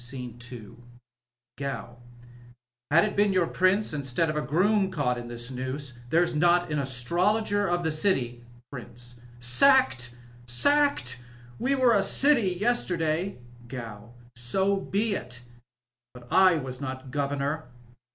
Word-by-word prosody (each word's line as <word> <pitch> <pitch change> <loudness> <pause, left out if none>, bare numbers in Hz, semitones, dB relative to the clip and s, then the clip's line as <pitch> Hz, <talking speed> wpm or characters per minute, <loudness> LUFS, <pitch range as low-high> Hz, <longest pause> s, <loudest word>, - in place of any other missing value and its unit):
Sc. 125 +3 -7 0.4
IL 115 -4 -10 0.8
Gow. 140 -3 -5 0.5
— 120 +1 -28
^Had 170 +3 +6
it 210 - -2
been 205 0 +3
your 185 -2 +2
Prince 185 +3 +1
instead 145 +2 -1
of - - -6
a 150 - 0
sroom 190 - +2
caissht 135 -8 0
in 120 - -8
this 120 +1 -4
nooM 130 +1 -4 0.3
Chere'i 170 +2 +2
not 175 +1 +3
an 150 - 0
astrologer 185 - +1
of 175 0 0
the 160 - 0
city 135 -8 0 0.3
Prxncb. 120 -1 -8
— 120 0 -21
Sackeal 125 - +3 0.3
Sacked 125 - +2
I 120 - -19 0.3
We 275 +2 +1
were 255 -3 +4
a 205 - +4
city 240 0 +4
yesterday. 185 -5 0 0.3
Gow. 115 -2 -9
— - - -39
So 190 +12 +1
be 200 +3 -1
it, 125 -8 -6 0.7
but 120 -1 -13
I 185 -2 +6
was 130 -2 -6
not 130 -1 -6
governor. 145 +2 -2
150 Hz, 145 wpm, -27 LUFS, 125-190 Hz, 0.8 s, ^Had